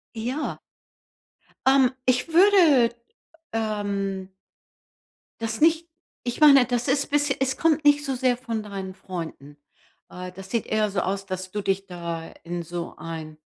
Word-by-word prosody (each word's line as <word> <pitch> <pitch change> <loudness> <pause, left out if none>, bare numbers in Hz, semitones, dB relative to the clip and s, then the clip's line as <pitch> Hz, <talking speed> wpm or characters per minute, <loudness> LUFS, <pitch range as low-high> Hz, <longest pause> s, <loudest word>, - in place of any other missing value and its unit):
Ja. 250 +7 -3 1.1
Ähm, 265 -1 +5
ich 255 +5 +2
würde, 330 - +6 0.6
ähm 200 -3 -2 1.1
das 225 +3 -3
nicht, 330 +1 +4 0.4
ich 240 -1 -4
meine, 280 -4 +8
das 245 0 -1
ist 280 +2 +1
bissche 290 -2 +2
es 265 0 0
kommt 310 -2 +2
nicht 290 0 +5
so 270 -2 -2
sehr 250 -1 +1
von 230 -4 -4
deinen 195 -2 -6
Freunden. 165 -6 -8 0.5
Äh, 180 0 -7
das 190 +1 -11
sieht 230 - -1
eher 215 -1 +1
so 190 - 0
aus, 195 +1 -2
dass 185 -1 -5
du 210 +1 -3
dich 195 0 -1
da 170 -2 -5
in 175 0 -4
so 170 +1 -6
ein 160 -2 -7
220 Hz, 145 wpm, -25 LUFS, 185-270 Hz, 1.1 s, meine